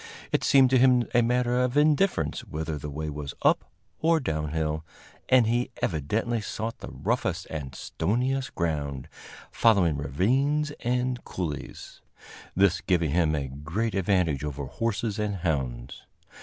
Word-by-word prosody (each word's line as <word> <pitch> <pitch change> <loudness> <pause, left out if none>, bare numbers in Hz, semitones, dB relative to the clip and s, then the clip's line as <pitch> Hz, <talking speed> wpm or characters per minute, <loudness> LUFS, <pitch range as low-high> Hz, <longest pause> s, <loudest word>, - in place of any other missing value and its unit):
It - - +1
seemed 135 -2 +5
to 130 - +5
him 125 -1 +4
a 120 - +5
matter 125 +1 +1
of 125 +2 +1
indifference 150 - +2
whether 80 -1 -4
the 75 - -6
way 75 +2 -4
was 75 -2 -5
up - - +2 0.3
or 165 0 +3
down 80 - -2
hill, 80 0 -2 0.5
and 130 -2 +6
he 120 +3 +1
evidently 105 - -1
sought 110 +2 -4
the - - -8
roughest - - -2
and 70 -4 -5
stoniest 130 - -1
ground, 75 -5 -2 0.4
following 95 -10 +3
ravines 130 - +1
and 125 0 -1
coulees 80 -6 -6 0.5
this 95 -1 +3
giving 85 -5 +1
him 80 -1 +2
a 70 -2 -2
great 75 - -3
advantage 90 -7 +1
over 70 -1 -4
horses 110 - -2
and 105 -1 -1
hounds. 65 -9 -3
95 Hz, 140 wpm, -27 LUFS, 75-125 Hz, 0.5 s, and